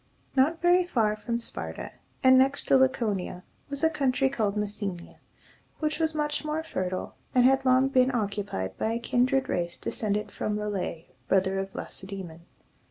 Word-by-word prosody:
Not 310 +6 +2
very 355 +1 +5
far 225 -11 +1
from 235 +2 -3
Sparta, 235 - -6 0.3
and 260 0 +7
next 270 +2 +3
to - - +3
Laconia, 215 -9 +1 0.3
was 280 +1 -2
a 320 - +6
country 270 -3 +1
called 215 -6 -1
Mes 210 0 -2
se´ni 180 -4 -4
a, - - -23 0.6
which 305 0 -1
was 320 -1 0
much 295 0 -1
more 305 +1 -2
fertile, 185 - -3 0.2
and 250 -1 +6
had 270 +1 +4
long 260 +1 +5
been 255 -1 +3
occupied 200 - -2
by 220 - 0
a 230 - -1
kindred 255 +3 +1
race 170 -1 -2
descended 210 -1 -2
from 210 0 -2
Le´lex, 200 -5 -3 0.2
brother 195 0 +2
of 195 0 -4
Lacedæmon. 190 -4 -6
235 Hz, 165 wpm, -27 LUFS, 195-270 Hz, 0.6 s, and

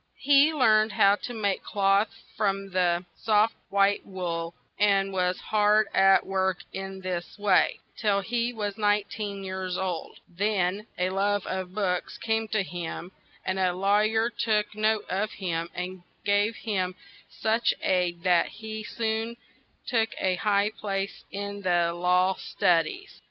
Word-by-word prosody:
He 285 +2 +5
learned 220 -7 +3
how 200 +1 +5
to 245 - -6
make 200 -3 0
cloth 200 +1 +2 0.3
from 195 -1 -1
the 180 -1 +1
soft 215 0 +2 0.2
white 200 0 +3
wool; 170 -3 -4 0.2
and 195 -1 +3
was 180 -1 0
hard 215 0 +3
at 195 0 +5
work, 190 -1 0 0.2
in 195 0 -6
this 180 -1 -4
way, 205 -1 +3 0.2
till 205 -3 +1
he 235 +3 -1
was 210 -2 -4
nine 205 0 +3
teen 200 -2 -5
years 185 -1 -3
old; 185 -3 -4
then 200 +2 -1
a 180 +1 0
love 200 +1 0
of 185 0 -4
books 185 -4 -1
came 225 0 -1
to 215 -2 0
him; 175 +1 -6 0.3
and 190 0 -1
a 185 -1 +2
law 195 +3 +2
yer 220 +2 +1
took 210 -2 0
note 215 0 +1
of 205 +3 -2
him 170 -3 -3
and 180 +1 -5 0.2
gave 205 +2 +2
him 185 -5 -2 0.3
such 225 +2 +1
aid 175 -2 0
that 180 -2 +4
he 220 0 -7
soon 225 +1 -2 0.5
took 225 -3 +1
a 185 - +1
high 205 +2 +1
place 195 -2 -4
in 200 0 -5
the 175 -2 +2
law 180 +2 +2
stud 165 -3 +2
ies. 390 +2 -10
200 Hz, 150 wpm, -27 LUFS, 185-215 Hz, 0.5 s, He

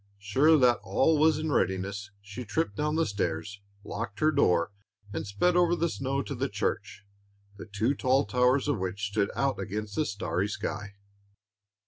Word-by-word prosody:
Sure 135 +11 +4
that 125 -3 +4
all 155 +2 +2
was 155 0 +4
in 155 0 -2
readiness, 100 -1 -1
she 100 +5 -7
tripped 105 0 -2
down 150 +5 -1
the 165 0 +2
stairs, 100 0 -3 0.2
locked 110 0 -5
her 155 0 +4
door, 90 - +2 0.4
and 105 - -4
sped 100 - +1
over 175 -1 +4
the 170 0 0
snow 135 -1 -2
to 140 - -5
the 135 +1 -2
church, 105 0 -3 0.5
the - - -9
two 110 +6 0
tall 135 0 +2
towers 125 +2 +2
of - - 0
which 95 +2 -3
stood 100 -1 0
out 135 -1 0
against 105 0 -4
the 155 - 0
starry 95 -2 -2
sky. 105 -1 -5
110 Hz, 170 wpm, -28 LUFS, 100-140 Hz, 0.5 s, Sure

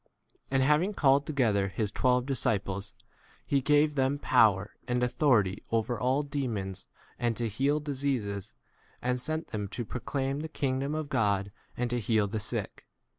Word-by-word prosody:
And 135 -1 +2
having 155 +9 +2
called 140 -2 +3
together 110 -10 +2
his 100 +3 -2
twelve 125 +2 +2
disciples 105 -7 -1 0.5
he 140 -1 +1
gave 150 +2 +3
them 135 0 +1
power 110 -8 +3 0.2
and 125 0 +1
authority 120 -6 +2
over 115 +1 0
all 130 +4 +1
de 145 0 -3
2 - - -3
mons 95 -3 -5 0.3
and 120 -2 0
to 120 - 0
heal 135 +8 +1
diseases, 130 -9 -2 0.4
and 125 0 -1
sent 155 +3 -3
them 105 -1 -3
to 115 +4 -5
proclaim 135 +4 -2
the 160 - -4
king 130 -4 -1
dom 140 +3 -2
of 155 -1 -3
God 100 -6 +1 0.3
and 125 - 0
to 120 - 0
heal 110 -1 +2
the 110 +2 -3
sick. - - -4
125 Hz, 170 wpm, -29 LUFS, 105-140 Hz, 0.5 s, called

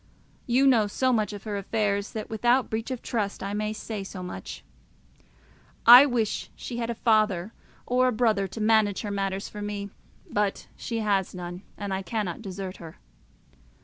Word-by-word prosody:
You 255 +3 +3
know 235 -6 +5
so 255 +5 +1
much 215 -3 +1
of 205 -1 -8
her 210 -2 -3
affairs 200 0 -1
that, 215 -1 -4
without 240 +3 +1
breach 225 +2 -2
of 255 -2 -5
trust, 210 -4 -2
I 200 +1 -3
may 210 +1 -1
say 215 -1 -5
so 190 -1 -7
much. 95 - -7 1.2
I 245 +5 +11
wish 235 -5 -1
she 240 - -6
had 235 -1 -2
a 235 - -2
father 215 -4 +2 0.3
or 255 +1 +3
a - - +3
brother 215 -4 +1
to 205 - -8
manage 215 -2 +3
her 210 - -4
matters 195 -1 -2
for 210 - -8
her; 205 -1 -4 0.4
but 205 -1 -1
she 230 -1 -3
has 195 -3 0
none, 175 0 -6 0.2
and 200 -2 -4
I 190 - -1
cannot 205 -2 -3
desert 190 -2 -6
her. 165 -2 -11
210 Hz, 180 wpm, -26 LUFS, 195-230 Hz, 1.2 s, I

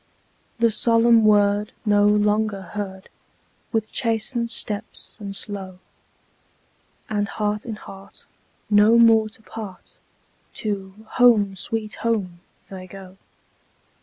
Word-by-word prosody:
The 230 -1 +3
solemn 230 0 +4
word 205 0 +3
no 205 -1 +4
longer 210 -1 +1
heard, 190 0 -7 0.6
With 220 -2 -1
chastened 235 0 -1
steps 215 0 -6
and 200 -2 -6
slow, 195 -3 -6 1.3
And 205 -1 -1
heart 210 0 -2
in 225 -3 -5
heart, 195 -1 -13 0.4
no 210 +2 +5
more 225 -2 +5
to 220 0 -16
part, 200 -1 -10 0.6
To 200 0 -5 0.2
"Home, 210 -5 +5
sweet 215 +3 -4
Home," 200 -7 -1 0.3
they 185 -1 -9
go. 190 0 -12
210 Hz, 105 wpm, -22 LUFS, 200-225 Hz, 1.3 s, no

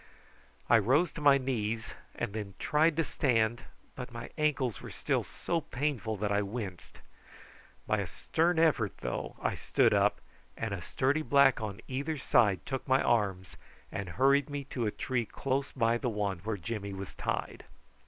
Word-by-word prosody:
I 120 - +6
rose 135 - +3
to 165 - -8
my 140 -1 +7
knees 115 -4 -2 0.2
and 120 -4 -3
then 105 -3 -5
tried 155 +1 +2
to 165 - +3
stand, 120 -5 +1 0.3
but 125 -1 -7
my 115 0 -7
ankles 140 - 0
were - - -8
still - - -1
so 170 -1 -2
painful 125 -7 -2
that 105 +1 -1
I 100 0 +3
winced. 100 -4 -6 0.8
By - - +1
a - - -2
stern 170 +2 0
effort, 145 - +2
though, - - -3
I - - +1
stood - - +2
up, - - +3 0.4
and 110 -2 -2
a 95 - -4
sturdy 135 - 0
black 135 -3 +4
on 105 0 -5
either 140 +4 -2
side 115 -8 +3
took 135 0 -4
my 130 0 +4
arms 95 -6 0 0.3
and 100 -3 -4
hurried 140 +2 +4
me 145 -1 -3
to 120 -4 0
a - - 0
tree 120 -1 -2
close 135 +1 -2
by 115 -2 +1
the 125 - -1
one 100 -4 -2
where 105 +3 -3
Jimmy 100 +2 -4
was 95 -1 -7
tied. - - -3
120 Hz, 175 wpm, -31 LUFS, 105-140 Hz, 0.8 s, my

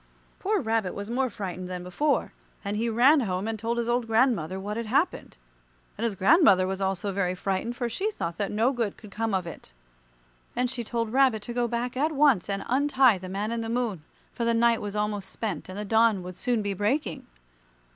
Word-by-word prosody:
Poor 415 +1 +1
Rabbit 220 - -1
was 205 +3 -5
more 260 +1 +1
frightened 185 -3 -6
than 180 -1 -5
before, 280 +12 0 0.3
and 200 +1 -2
he 230 +2 0
ran 255 +7 +5
home 190 -4 -2
and 225 -1 -3
told 230 +2 -2
his 235 -1 -1
old 240 -1 0
grandmother 220 -7 +2
what 205 +2 -4
had 230 0 -4
happened. 280 - 0 0.6
And 220 - -5
his 230 -4 0
grandmother 195 - +5
was 190 +1 -3
also 195 +1 -1
very 185 -2 -1
frightened, 195 +6 -2
for 245 -1 -2
she 380 - -1
thought 170 - -5
that 200 - -1
no 225 +5 +2
good 230 -6 -2
could 210 - -13
come 225 0 -1
of 185 -2 -1
it. 160 - -10 0.8
And 250 0 0
she 240 -2 -3
told 230 0 -3
Rabbit 260 -6 +3
to 240 - -5
go 240 0 +1
back 240 +1 -3
at 300 +5 +1
once 275 - +3
and 195 0 -2
untie 265 -4 +4
the 185 0 -8
Man 205 +4 -2
in 235 0 -2
the 225 - -4
Moon, 230 -7 -1 0.3
for 235 - -3
the 235 0 +2
night 235 0 +3
was 205 0 -5
almost 210 -2 -2
spent, 195 -7 -4
and 185 - -7
the 210 - -4
dawn 220 -2 +3
would 180 0 -8
soon 240 +1 0
be 200 -1 -1
breaking. 215 +10 -1
225 Hz, 215 wpm, -27 LUFS, 195-245 Hz, 0.8 s, ran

